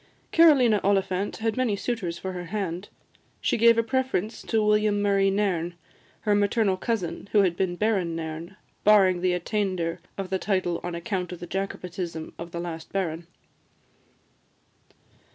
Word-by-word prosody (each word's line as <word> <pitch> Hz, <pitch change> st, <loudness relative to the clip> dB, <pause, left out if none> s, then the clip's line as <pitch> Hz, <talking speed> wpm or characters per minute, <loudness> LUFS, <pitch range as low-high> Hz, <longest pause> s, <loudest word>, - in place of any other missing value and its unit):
Carolina 260 Hz, -, +6 dB
Oliphant 195 Hz, 0 st, +1 dB
had 225 Hz, -1 st, -1 dB
many 255 Hz, -5 st, +1 dB
suitors 200 Hz, -6 st, -3 dB
for 190 Hz, -, -5 dB
her 180 Hz, -1 st, -6 dB
hand: 185 Hz, -1 st, -4 dB, 0.5 s
she -, -, +1 dB
gave 230 Hz, 0 st, +5 dB
a 230 Hz, -, +3 dB
preference 235 Hz, -4 st, -1 dB
to 220 Hz, -1 st, 0 dB
William 210 Hz, -1 st, +3 dB
Murray 200 Hz, -1 st, +3 dB
Nairn, 185 Hz, -4 st, 0 dB, 0.5 s
her 210 Hz, -, +2 dB
maternal 205 Hz, 0 st, +2 dB
cousin, 200 Hz, -2 st, -3 dB
who 205 Hz, -2 st, +6 dB
had 175 Hz, -3 st, +1 dB
been 180 Hz, -1 st, -1 dB
Baron 190 Hz, -5 st, 0 dB
Nairn, 165 Hz, +3 st, -6 dB, 0.3 s
barring 190 Hz, -4 st, +5 dB
the 180 Hz, 0 st, +2 dB
attainder 180 Hz, -2 st, -1 dB, 0.2 s
of 190 Hz, -2 st, -5 dB
the 190 Hz, -, +1 dB
title 185 Hz, -4 st, 0 dB
on 175 Hz, -1 st, -4 dB
account 180 Hz, +1 st, -3 dB
of 180 Hz, -, -7 dB
the 175 Hz, -, -6 dB
Jacobitism 180 Hz, -3 st, -4 dB
of 170 Hz, 0 st, -6 dB
the 170 Hz, -, -5 dB
last 165 Hz, -2 st, -6 dB
Baron. 170 Hz, -3 st, -2 dB
190 Hz, 150 wpm, -26 LUFS, 175-210 Hz, 0.5 s, Carolina